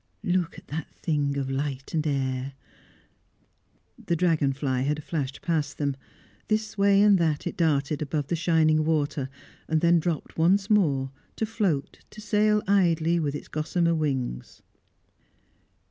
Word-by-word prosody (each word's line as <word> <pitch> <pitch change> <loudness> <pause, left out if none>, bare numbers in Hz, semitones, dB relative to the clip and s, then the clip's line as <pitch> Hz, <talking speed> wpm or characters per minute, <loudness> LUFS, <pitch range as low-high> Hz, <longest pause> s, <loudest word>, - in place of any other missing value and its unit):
look 180 -3 0
at - - -12
that 155 +1 -6
thing 145 -3 -1
of 135 -1 -2
light 135 -1 -3
and 155 -1 0
air!" 135 -1 -1 1.5
The 170 - 0
dragon 160 -5 +2
fly 130 -2 -1
had 150 +2 -1
flashed 140 -5 -4
past 160 -4 -1
them. 140 -2 -1 0.5
This 215 0 -1
way 200 0 +4
and 205 -3 +5
that 155 -3 0
it - - -3
darted 150 -3 +1
above 150 0 -2
the 170 - -1
shining 155 -2 +3
water, 150 -3 0 0.4
then 170 +2 +4
dropped 165 -1 -3
once 195 +5 +3
more, 140 -10 +2 0.2
to 220 - -1
float, 200 -10 -1
to - - -13
sail 210 0 +2
idly 170 -4 +3
with 145 -3 -1
its - - -7
gossamer 170 +2 0
wings. 135 - -3
155 Hz, 145 wpm, -26 LUFS, 140-175 Hz, 1.5 s, and